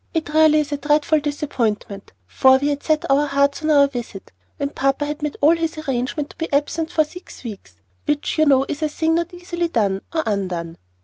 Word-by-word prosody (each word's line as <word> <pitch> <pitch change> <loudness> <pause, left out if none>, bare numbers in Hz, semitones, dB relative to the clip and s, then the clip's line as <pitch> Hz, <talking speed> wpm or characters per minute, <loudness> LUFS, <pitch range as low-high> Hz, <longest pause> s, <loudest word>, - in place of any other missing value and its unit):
It 320 -2 -1
really 310 -1 +5
is 295 0 -6
a 290 - -1
dreadful 300 +2 +2
disappointment, 235 -9 -3
for 260 - +5
we 285 +2 0
had 290 0 -2
set 310 -1 0
our 280 +2 +3
hearts 280 +1 +1
on 310 - -1
our 285 -2 +6
visit, 240 -7 -7 0.3
and 280 0 -2
papa 275 +2 0
had 295 +1 -5
made 300 -1 -3
all 310 +4 +6
his 330 -1 -3
arrangements 280 0 -2
to - - -20
be 325 - -4
absent 300 +3 0
for 315 -2 +3
six 350 +1 -12
weeks, 205 - -9 0.3
which 295 +2 -1
you 310 - +4
know 270 -1 +4
is 290 - -5
a 310 - +1
thing 320 +2 0
not 340 +1 0
easily 350 -1 -3
done, 200 - 0
or 320 -1 0
undone. 180 -5 -3
290 Hz, 210 wpm, -21 LUFS, 265-310 Hz, 0.3 s, our